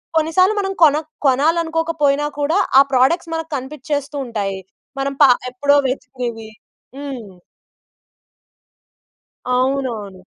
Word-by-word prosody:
కొన్నిసార్లు 330 Hz, +6 st, +3 dB
మనం 390 Hz, -1 st, -1 dB
కోన 300 Hz, -2 st, +6 dB, 0.3 s
కొనాలనుకోకపోయినా 320 Hz, 0 st, +1 dB
కూడా 300 Hz, +6 st, +1 dB, 0.2 s
ఆ -, -, +10 dB
ప్రొడక్ట్స్ 300 Hz, +6 st, +2 dB
మనకు 325 Hz, 0 st, -4 dB
కనిపించేస్తూ 285 Hz, +2 st, -4 dB
ఉంటాయి. 200 Hz, -4 st, -3 dB, 0.4 s
మనం 275 Hz, 0 st, -1 dB
పా 275 Hz, -, +8 dB, 0.2 s
ఎప్పుడో 285 Hz, +3 st, +2 dB
వెతికేవి. 245 Hz, -4 st, -5 dB, 0.5 s
హ్మ్. 245 Hz, -10 st, -8 dB, 2.2 s
అవునవును. 250 Hz, -8 st, -2 dB
280 Hz, 90 wpm, -19 LUFS, 250-320 Hz, 2.2 s, ఆ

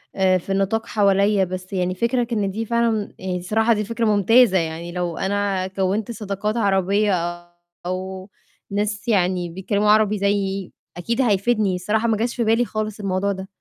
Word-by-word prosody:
آآ، 190 Hz, -1 st, +3 dB
في 185 Hz, +2 st, -7 dB
النطاق 195 Hz, +4 st, 0 dB
حواليّا، 200 Hz, -1 st, +3 dB
بس 185 Hz, +1 st, -6 dB
يعني 185 Hz, -1 st, -1 dB
فِكرك 235 Hz, +3 st, 0 dB
إن 205 Hz, -3 st, 0 dB
دي 225 Hz, +3 st, -3 dB
فعلًا 230 Hz, -2 st, 0 dB
آآ، -, -, -10 dB
الصراحة 220 Hz, +6 st, +1 dB
دي 210 Hz, -1 st, -1 dB
فكرة 230 Hz, +2 st, -2 dB
ممتازة، 215 Hz, +1 st, +4 dB
يعني 165 Hz, 0 st, -3 dB
لو 175 Hz, -1 st, -3 dB
أنا 195 Hz, -1 st, -1 dB
كوّنت 195 Hz, +3 st, -1 dB
صداقات 210 Hz, 0 st, -3 dB
عربية 200 Hz, -1 st, +2 dB, 0.7 s
أو 185 Hz, +1 st, -5 dB, 0.4 s
ناس 205 Hz, +1 st, -2 dB
يعني 180 Hz, -4 st, +1 dB
بيتكلموا 200 Hz, +4 st, -1 dB
عربي 215 Hz, -1 st, +3 dB
زيّي، 200 Hz, -1 st, -1 dB, 0.3 s
أكيد 230 Hz, +8 st, -1 dB
هيفيدني، 210 Hz, -3 st, +2 dB
الصراحة 210 Hz, +5 st, 0 dB
ما 225 Hz, -2 st, +1 dB
جاش 235 Hz, +3 st, -1 dB
في 235 Hz, -, 0 dB
بالي 225 Hz, +2 st, +2 dB
خالص 215 Hz, -1 st, -4 dB
الموضوع 195 Hz, 0 st, -1 dB
ده. 190 Hz, -1 st, -6 dB
200 Hz, 165 wpm, -22 LUFS, 190-220 Hz, 0.7 s, ممتازة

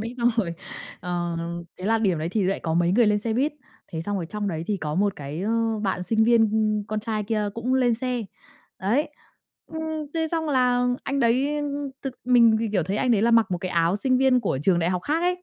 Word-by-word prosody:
ấy. 230 Hz, +3 st, -5 dB
Xong 240 Hz, 0 st, +3 dB
rồi, 180 Hz, -7 st, 0 dB, 0.5 s
ờ, 175 Hz, -1 st, -2 dB, 0.4 s
thế 185 Hz, -, -7 dB
là 225 Hz, +1 st, +3 dB
điểm 190 Hz, -7 st, +1 dB
đấy 160 Hz, +2 st, -2 dB
thì 205 Hz, +1 st, 0 dB
lại 195 Hz, +2 st, 0 dB
có 160 Hz, -1 st, -2 dB
mấy 175 Hz, +1 st, +2 dB
người 235 Hz, +1 st, +4 dB
lên 210 Hz, 0 st, +3 dB
xe 220 Hz, +2 st, -2 dB
buýt. 275 Hz, +7 st, +1 dB, 0.4 s
Thế 160 Hz, 0 st, -3 dB
xong 205 Hz, +2 st, -2 dB
rồi 175 Hz, -, -3 dB
trong 205 Hz, +3 st, -3 dB
đấy 160 Hz, -2 st, -3 dB
thì 210 Hz, -, 0 dB
có 150 Hz, -5 st, -4 dB
một 200 Hz, +3 st, +1 dB
cái, 145 Hz, +3 st, -6 dB
ơ, 225 Hz, 0 st, 0 dB
bạn 190 Hz, -3 st, -1 dB
sinh 220 Hz, +3 st, +2 dB
viên 230 Hz, -2 st, +4 dB, 0.4 s
con 215 Hz, 0 st, -2 dB
trai 215 Hz, -1 st, -2 dB
kia 210 Hz, -1 st, -1 dB
cũng 245 Hz, +3 st, -1 dB
lên 245 Hz, -3 st, +3 dB
xe, 250 Hz, 0 st, -2 dB, 0.6 s
đấy. 235 Hz, +11 st, +1 dB, 0.6 s
Ừm, 320 Hz, 0 st, -6 dB, 0.3 s
thế 320 Hz, -1 st, 0 dB
xong 325 Hz, -2 st, -1 dB
là 250 Hz, -2 st, +2 dB, 0.2 s
anh 275 Hz, 0 st, -1 dB
đấy, 260 Hz, +5 st, +2 dB
ưm, 295 Hz, -, -2 dB
ưm, 285 Hz, -1 st, -4 dB
thực 270 Hz, -2 st, -4 dB
mình 235 Hz, -3 st, +5 dB
thì, 230 Hz, -, -1 dB
kiểu, 190 Hz, -4 st, +2 dB
thấy 190 Hz, +5 st, -2 dB
anh 255 Hz, +2 st, +1 dB
đấy 215 Hz, -3 st, +3 dB
là 235 Hz, -, +3 dB
mặc 230 Hz, -3 st, +4 dB
một 180 Hz, -, -1 dB
cái 185 Hz, 0 st, -4 dB
áo 170 Hz, +2 st, +2 dB
sinh 255 Hz, +5 st, +1 dB
viên 260 Hz, -2 st, +4 dB
của 135 Hz, -, -1 dB
trường 180 Hz, 0 st, +3 dB
đại 170 Hz, +1 st, +1 dB
học 180 Hz, -1 st, -2 dB
khác 310 Hz, -, 0 dB
ấy. 360 Hz, 0 st, 0 dB
220 Hz, 250 wpm, -24 LUFS, 185-250 Hz, 0.6 s, mình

